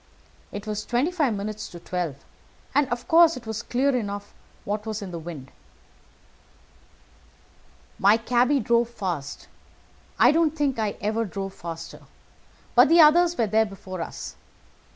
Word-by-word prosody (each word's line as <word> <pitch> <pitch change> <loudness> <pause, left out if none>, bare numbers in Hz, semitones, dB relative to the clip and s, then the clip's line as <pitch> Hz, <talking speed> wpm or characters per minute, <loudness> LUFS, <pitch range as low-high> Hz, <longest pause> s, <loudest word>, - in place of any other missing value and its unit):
It 205 +1 -7
was 210 -1 -3
twenty 250 +8 0
five 295 -11 +1
minutes 210 +1 -5
to 175 - -10
twelve, 175 -4 -3 0.6
and 290 -2 +2
of 240 0 -4
course 335 -2 +6
it 240 - -10
was 220 0 -4
clear 260 +3 0
enough 205 -4 -4 0.3
what 210 +2 -3
was 215 -1 -4
in 190 - -7
the 170 - -5
wind. 155 -5 -9 2.5
"My 205 +3 +5
cabby 245 +4 +2
drove 235 0 +2
fast. 175 -11 -5 0.7
I - - +6
don't 320 -1 +2
think 280 -5 0
I 215 -2 -1
ever 220 +2 0
drove 195 -2 -5
faster, 165 -1 -8 0.7
but 245 +3 +6
the 335 +1 +6
others 340 +2 +6
were 230 - +2
there 220 +1 +2
before 185 -2 -8
us. - - -7
220 Hz, 150 wpm, -25 LUFS, 195-260 Hz, 2.5 s, course